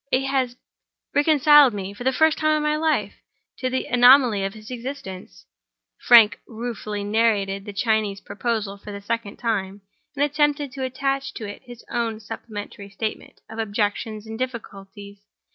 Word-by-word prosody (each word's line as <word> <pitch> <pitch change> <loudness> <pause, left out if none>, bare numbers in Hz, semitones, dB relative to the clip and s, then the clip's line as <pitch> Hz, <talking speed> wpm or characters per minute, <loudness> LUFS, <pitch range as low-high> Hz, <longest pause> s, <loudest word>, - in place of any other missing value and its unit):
It 260 - +2
has 260 -3 0 0.6
reconciled 295 -4 +6
me, 195 0 -5
for 205 - -9
the 260 - +2
first 315 +4 +3
time 310 0 +2
in 300 - -2
my 300 0 +1
life, 315 0 0 0.5
to 255 - -1
the 260 0 -2
anomaly 245 -4 +5
of 195 +2 -3
his 215 +2 -11
existence." 235 - -8 0.5
Frank 230 -4 +6
ruefully 220 -3 -5
narrated 205 -2 +1
the 205 - -6
Chinese 210 -1 0
proposal 210 -2 -3
for 205 - -9
the 200 - -6
second 205 0 -4
time, 200 -4 -2 0.3
and 285 0 +2
attempted 295 -1 0
to 265 0 -5
attach 270 +1 -2
to 220 - -6
it 205 - -9
his 240 -2 -12
own 230 -2 -2
supplementary 210 -2 -8
statement 215 +2 -6
of 220 - -9
objections 215 0 -2
and 220 +1 -8
difficulties. 200 -5 -7
230 Hz, 160 wpm, -23 LUFS, 205-265 Hz, 0.6 s, reconciled